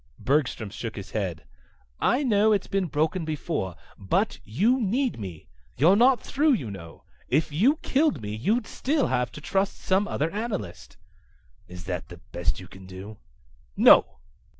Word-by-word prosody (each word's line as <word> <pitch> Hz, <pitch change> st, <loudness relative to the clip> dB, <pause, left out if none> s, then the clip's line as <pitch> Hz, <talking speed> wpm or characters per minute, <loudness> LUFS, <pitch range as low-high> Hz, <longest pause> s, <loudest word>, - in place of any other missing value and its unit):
Bergstrom 125 Hz, -4 st, 0 dB
shook 115 Hz, +1 st, -6 dB
his 100 Hz, -2 st, -8 dB
head. 95 Hz, -, -3 dB, 0.6 s
"I 255 Hz, +5 st, +2 dB
know 215 Hz, -4 st, +3 dB
it's 200 Hz, -, 0 dB
been 195 Hz, -2 st, -1 dB
broken 160 Hz, +4 st, 0 dB
before. 150 Hz, -, -3 dB, 0.2 s
But 95 Hz, -, 0 dB
you 215 Hz, -, +1 dB
need 235 Hz, -, 0 dB
me. 90 Hz, -6 st, -8 dB, 0.3 s
You're 165 Hz, +10 st, +5 dB
not 245 Hz, +3 st, +5 dB
through, 290 Hz, +1 st, +2 dB
you 125 Hz, -, -2 dB
know. 85 Hz, -4 st, -11 dB, 0.2 s
If 150 Hz, +4 st, +1 dB
you 220 Hz, -, +3 dB
killed 280 Hz, -, +2 dB
me 105 Hz, -1 st, -5 dB
you'd 215 Hz, -, 0 dB
still 290 Hz, +1 st, 0 dB
have 125 Hz, 0 st, 0 dB
to 150 Hz, -, -9 dB
trust 195 Hz, +5 st, -1 dB
some 195 Hz, +2 st, +1 dB
other 155 Hz, +3 st, -1 dB
analyst." 215 Hz, 0 st, -5 dB, 0.7 s
"Is 90 Hz, -1 st, -10 dB
that 90 Hz, -1 st, -4 dB
the 85 Hz, -, -10 dB
best 85 Hz, -2 st, -1 dB
you 90 Hz, -, -10 dB
can 95 Hz, 0 st, -13 dB
do?" 95 Hz, +3 st, -9 dB, 0.6 s
"No." -, -, +6 dB
155 Hz, 160 wpm, -26 LUFS, -, 0.7 s, No